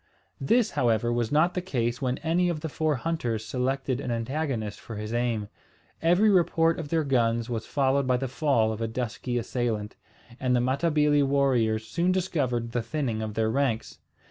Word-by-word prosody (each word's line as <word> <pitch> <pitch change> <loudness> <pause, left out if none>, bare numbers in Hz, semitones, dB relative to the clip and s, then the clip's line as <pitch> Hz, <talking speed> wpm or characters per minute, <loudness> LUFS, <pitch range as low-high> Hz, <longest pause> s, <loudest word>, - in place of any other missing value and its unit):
This, 225 - +2
however, 120 -1 +1
was 120 -1 -1
not 155 +4 +3
the 180 - -2
case 125 -8 -2
when 130 -1 0
any 175 +2 +2
of 160 -3 -3
the 160 - -3
four 155 0 0
hunters 120 -7 -2
selected 130 +1 -1
an 130 - -4
antagonist 120 -2 -2
for 115 - -9
his 105 +2 -5
aim. 120 -3 0 0.5
Every 180 +6 +4
report 165 -2 +3
of 155 -3 -5
their 160 0 +1
guns 120 -3 +1
was 115 -1 -3
followed 135 -1 +1
by 125 -1 +3
the 135 +1 -2
fall 130 -5 +1
of 110 - -7
a 115 - 0
dusky 120 +1 -3
assailant; 115 -3 -2 0.4
and 125 -1 +1
the - - +3
Matabili 145 +3 +2
warriors 130 -6 +2
soon 175 +8 0
discovered 135 -11 -1
the 120 - -1
thinning 115 -2 -2
of 110 -1 -4
their 110 0 +1
ranks. 115 -3 -1
130 Hz, 180 wpm, -27 LUFS, 115-150 Hz, 0.5 s, Every